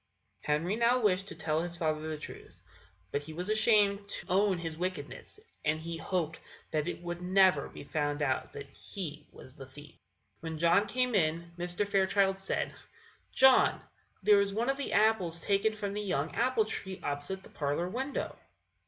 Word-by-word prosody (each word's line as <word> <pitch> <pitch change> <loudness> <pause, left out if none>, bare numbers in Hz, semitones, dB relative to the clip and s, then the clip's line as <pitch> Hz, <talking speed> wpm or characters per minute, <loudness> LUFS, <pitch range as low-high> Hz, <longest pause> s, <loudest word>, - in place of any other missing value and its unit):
Henry 160 +7 0
now 235 +2 +3
wished 195 -4 +1
to - - -7
tell 160 -1 0
his 175 0 -4
father 155 -2 -1
the 155 - -3
truth; 150 - -10 0.5
but 145 - -1
he 155 +2 -9
was 180 +6 -3
ashamed 210 -2 +3
to - - -5
own 195 0 +3
his 165 -2 -5
wickedness, 185 - -5 0.2
and 155 +1 +1
he 165 +1 -5
hoped 165 -1 -2 0.3
that 155 -1 0
it - - -4
would 175 0 -5
never 185 +1 +4
be - - -10
found 145 0 -1
out 130 -2 -1
that 140 0 -7
he 155 -2 -7
was 130 - -13
the 135 -1 -11
thief. 145 +4 -13 0.5
When 165 -1 -5
John 170 +6 +4
came 250 +3 0
in, 170 -2 +1
Mr. 175 +3 -2
Fairchild 195 0 +2
said: 195 - -2 0.6
"John, 265 0 +5 0.4
there 205 0 +6
is 200 0 0
one 235 +4 +2
of 275 - -4
the 280 - -3
apples 200 -6 +3
taken 200 +4 +1
from 205 -2 -4
the 210 - -2
young 155 -8 -1
apple 235 -2 +2
tree 190 -3 -4
opposite 145 +7 -3
the - - -14
parlour 145 +4 -1
window." 260 +8 -3
180 Hz, 180 wpm, -31 LUFS, 155-205 Hz, 0.6 s, there